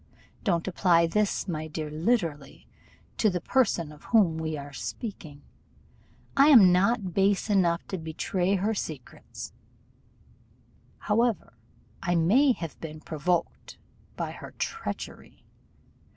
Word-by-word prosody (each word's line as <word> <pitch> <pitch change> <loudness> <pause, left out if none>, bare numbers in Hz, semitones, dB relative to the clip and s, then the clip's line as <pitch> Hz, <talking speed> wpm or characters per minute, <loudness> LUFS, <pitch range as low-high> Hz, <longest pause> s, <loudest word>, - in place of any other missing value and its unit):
Don't 170 -5 0
apply 175 -2 +3
this, 205 +4 0
my 155 -3 -3
dear, 155 -1 -5
literally, 160 - -2 0.5
to 215 - +3
the 180 -2 -2
person 175 - +1
of 150 - -15
whom 185 -9 +3
we 160 -1 -3
were 140 0 -9
speaking; 155 - -7 0.9
I 275 +1 +6
am 225 -11 +8
not 195 +1 +1
base 195 +2 +2
enough 175 -4 +2
to 190 - -3
betray 175 +4 -1
her 205 +4 0
secrets, 155 - -7 1.4
however 225 - 0 0.5
I 175 0 0
may 225 - +4
have 165 -8 -8
been 155 -1 -7
provoked 165 +2 -2 0.4
by - - -3
her - - -11
treachery. 455 - -6
180 Hz, 120 wpm, -27 LUFS, 160-210 Hz, 1.4 s, am